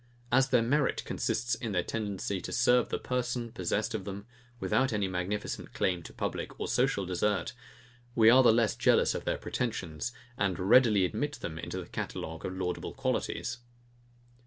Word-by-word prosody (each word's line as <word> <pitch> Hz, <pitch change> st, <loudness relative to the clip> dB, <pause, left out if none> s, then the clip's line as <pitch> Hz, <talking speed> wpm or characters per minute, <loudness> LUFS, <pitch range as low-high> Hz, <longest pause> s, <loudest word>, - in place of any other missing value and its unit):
As 135 Hz, +2 st, +4 dB
their 125 Hz, -3 st, +4 dB
merit 140 Hz, +4 st, +1 dB
consists 120 Hz, +1 st, -1 dB
in 115 Hz, -5 st, -3 dB
their 90 Hz, -2 st, +1 dB
tendency 100 Hz, -2 st, -3 dB
to -, -, -6 dB
serve 125 Hz, 0 st, +3 dB
the -, -, -1 dB
person, 125 Hz, -2 st, -2 dB
possessed 110 Hz, +2 st, -1 dB
of 110 Hz, -3 st, -3 dB
them, 100 Hz, +1 st, -6 dB, 0.3 s
without 135 Hz, +2 st, +1 dB
any 105 Hz, -3 st, 0 dB
magnificent 95 Hz, +3 st, -3 dB
claim 90 Hz, -2 st, +1 dB
to -, -, -10 dB
public -, -, -4 dB
and -, -, -2 dB
social 125 Hz, -6 st, +1 dB
desert, 100 Hz, +5 st, 0 dB, 0.6 s
we 110 Hz, -2 st, +5 dB
are 125 Hz, +3 st, +8 dB
the 120 Hz, -, +7 dB
less 115 Hz, -2 st, +2 dB
jealous -, -, +3 dB
of -, -, -5 dB
their -, -, 0 dB
pretensions, 100 Hz, -5 st, -3 dB, 0.3 s
and 100 Hz, -3 st, +1 dB
readily 105 Hz, 0 st, +5 dB
admit 145 Hz, +10 st, -2 dB
them 80 Hz, -, -6 dB
into -, -, -5 dB
the -, -, -6 dB
catalogue 80 Hz, 0 st, -5 dB
of 95 Hz, 0 st, -4 dB
laudable 90 Hz, -1 st, -3 dB
qualities. 120 Hz, -, -2 dB
110 Hz, 170 wpm, -30 LUFS, 95-120 Hz, 0.6 s, are